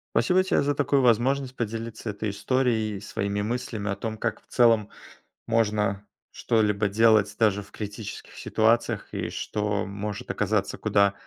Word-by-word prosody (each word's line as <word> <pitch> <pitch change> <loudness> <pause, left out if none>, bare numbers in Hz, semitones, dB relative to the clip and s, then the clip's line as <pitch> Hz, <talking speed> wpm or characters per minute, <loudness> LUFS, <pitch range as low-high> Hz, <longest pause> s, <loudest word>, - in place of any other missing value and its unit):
Спасибо 180 +11 +4
тебе 190 - +2
за 145 0 0
такую 140 -1 +2
возможность 130 +2 +2
поделиться 115 -1 -4
этой 105 0 -3
историей 110 0 0
и - - -8
своими 100 0 -3
мыслями 110 -1 -3
о 100 - -1
том, 110 +1 -5
как 115 0 -2
в - - -47
целом 115 -4 +3 0.6
можно 105 -3 0 0.2
что-либо 105 -3 +1
делать 110 0 +4
даже 105 -3 +2
в 100 - -15
критических 105 0 -7
ситуациях, 115 +2 +1
и - - -3
что 105 -1 -2
может 100 +1 -5
оказаться - - -1
куда 100 0 +3
110 Hz, 150 wpm, -26 LUFS, 105-115 Hz, 0.6 s, Спасибо